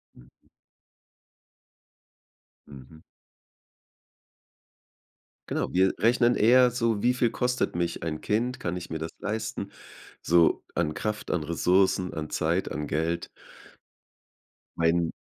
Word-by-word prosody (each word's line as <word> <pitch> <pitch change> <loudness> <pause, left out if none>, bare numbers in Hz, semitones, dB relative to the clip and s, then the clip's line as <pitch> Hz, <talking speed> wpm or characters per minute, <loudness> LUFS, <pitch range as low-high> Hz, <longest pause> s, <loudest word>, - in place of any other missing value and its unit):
Hm. - - -17 2.4
Mhm. 70 +3 -14 2.5
Genau, - - -2
wir 95 +1 +3
rechnen 120 +1 +3
eher 125 +3 +5
so: 115 -3 0
„Wie 125 - +4
viel 125 -2 +1
kostet 125 -2 -1
mich 85 -1 -2
ein 80 -2 -3
Kind? 125 +5 -1
Kann 90 -6 -3
ich 90 - -8
mir 80 - -3
das 80 +1 -5
leisten, 110 +2 -4 0.5
so 85 0 +3
an 80 -3 -1
Kraft, 105 -1 -3
an 80 -4 0
Ressourcen, 90 +3 +1
an 75 0 -5
Zeit, 85 +4 0
an 75 -1 -4
Geld?“ 85 +2 -2 1.5
Mein 85 0 +2
90 Hz, 110 wpm, -27 LUFS, 80-115 Hz, 2.5 s, eher